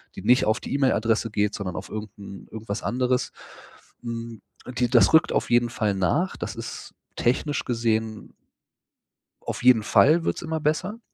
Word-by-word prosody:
die 95 - -8
nicht 125 +4 +4
auf 110 +2 +1
die - - -6
E-Mail-Adresse 115 -5 +1
geht, 105 -1 0
sondern 95 -4 -5
auf - - -6
irgend 105 -1 -7
'n 100 -1 -10
irgendwas 110 -1 -5
anderes. 125 0 -1 0.7
Mhm, 115 -1 -6 0.4
die 125 -1 +2
das 120 +4 +5
rückt 160 - +5
auf - - 0
jeden 120 0 +3
Fall 105 -3 -1
nach. 145 - 0
Das - - -5
ist 115 0 -8 0.2
technisch 145 +5 0
gesehen 110 -2 -2 1.1
auf - - -5
jeden 125 -4 +6
Fall 165 +8 +4
wird - - -1
es - - -5
immer 160 -1 -3
besser. 185 +9 -1
115 Hz, 165 wpm, -24 LUFS, 110-130 Hz, 1.1 s, jeden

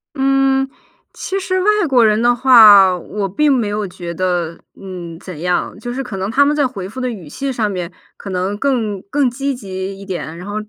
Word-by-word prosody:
嗯， 270 0 +2 0.4
其 390 - -4
实 375 -1 -1
外 410 - +3 0.2
国 250 -4 +4
人 215 0 +3
的 240 +1 +3
话， 210 -7 +7
我 195 +3 -4
并 290 +10 +2
没 240 -6 +1
有 205 0 -2
觉 175 -1 -7
得， 175 -2 -2 0.2
嗯， 175 -4 -8
怎 180 -5 -9
样。 180 +3 -1
就 240 +3 -6
是 265 +2 -3
可 230 -6 -7
能 190 +2 -3
他 280 +5 +4
们 290 +1 +1
在 290 -2 +2
回 195 -7 -6
复 220 +6 -8
的 255 -1 -1
语 185 -9 -9
气 270 - -4
上 220 -4 -1
面 180 -2 -5 0.2
可 200 - -9
能 185 +2 -2
更 220 -7 -1
更 280 -3 +1
积 275 +3 -3
极 195 -4 -6
一 195 - -10
点， 175 -4 -6
然 180 - -9
后 205 - -6
210 Hz, 230 characters per minute, -17 LUFS, 185-265 Hz, 0.4 s, 话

